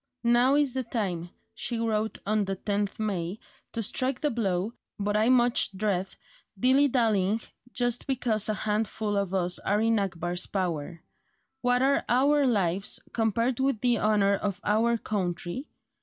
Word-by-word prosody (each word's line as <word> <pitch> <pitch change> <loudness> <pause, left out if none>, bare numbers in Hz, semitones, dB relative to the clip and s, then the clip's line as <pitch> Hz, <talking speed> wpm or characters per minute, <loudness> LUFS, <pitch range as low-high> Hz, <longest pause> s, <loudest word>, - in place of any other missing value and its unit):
"Now 240 +3 +4
is 290 -3 +2
the 260 - -1
time," 195 -8 -3 0.2
she 235 +1 -3
wrote 220 -1 -1
on 210 0 +1
the 195 0 -2
10th 205 +1 -2
May, 195 -3 -2 0.4
"to 230 - -2
strike 255 +4 -1
the 295 - +1
blow, 200 -2 -1 0.2
but 205 0 -1
I 215 +3 +3
much 245 -3 +3
dread 195 -2 0 0.5
dilly 265 +5 +5
dallying 220 -5 +2 0.3
just 245 0 -2
because 235 -6 0
a 215 - +1
handful 210 0 -1
of 200 -2 0
us 180 -1 0
are 205 +2 0
in 225 0 +2
Akbar's 175 -2 -2
power. 170 -4 -3 0.6
What 245 +1 +2
are 275 +1 +3
our 280 +3 +4
lives 195 -4 +1
compared 230 +2 +1
with 265 -4 +1
the 245 -3 +2
honour 205 -2 +3
of 200 -1 -2
our 230 +3 +2
country? 185 - -3
215 Hz, 155 wpm, -27 LUFS, 195-245 Hz, 0.6 s, dilly